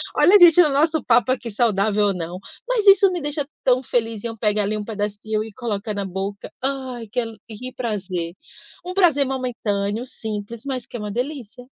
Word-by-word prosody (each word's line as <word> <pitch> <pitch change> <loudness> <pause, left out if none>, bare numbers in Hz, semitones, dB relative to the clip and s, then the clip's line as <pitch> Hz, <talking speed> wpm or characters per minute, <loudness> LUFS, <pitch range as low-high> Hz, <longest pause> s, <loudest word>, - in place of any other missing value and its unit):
Olha, 410 +3 +7
gente, 350 -1 +8
o 320 - +5
nosso 310 +3 +2
papo 250 +2 +3
que 240 - -9
e - - -5
saudável, 210 -1 +2
ou 200 - +1
não, 175 0 -5 0.3
mas 485 -4 +1
isso 390 0 +8
me 350 -3 -3
deixa 290 -1 -2 0.2
tão 255 -1 +3
feliz, 225 -4 -2
em - - -2
eu 225 -1 -7
pegar 210 -1 +1
ali 205 +2 -1
um 210 - -4
pedacinho 210 0 -3
e 220 -1 -10
coloca 215 -2 -3
na 200 -1 -3
boca. 195 +2 -5
Ai, 260 -4 -3
que 230 - -2
ale 225 -2 -3
que 250 +4 -7
prazer! 190 -8 -3 0.5
Um 365 - -4
prazer 335 -7 +4
momentâneo, 230 -4 -2
simples, 220 -2 -6
mas 260 -3 -3
que 240 - -8
é - - -8
uma 210 -1 -5
delícia. 250 -1 -5
230 Hz, 205 wpm, -22 LUFS, 205-265 Hz, 0.5 s, gente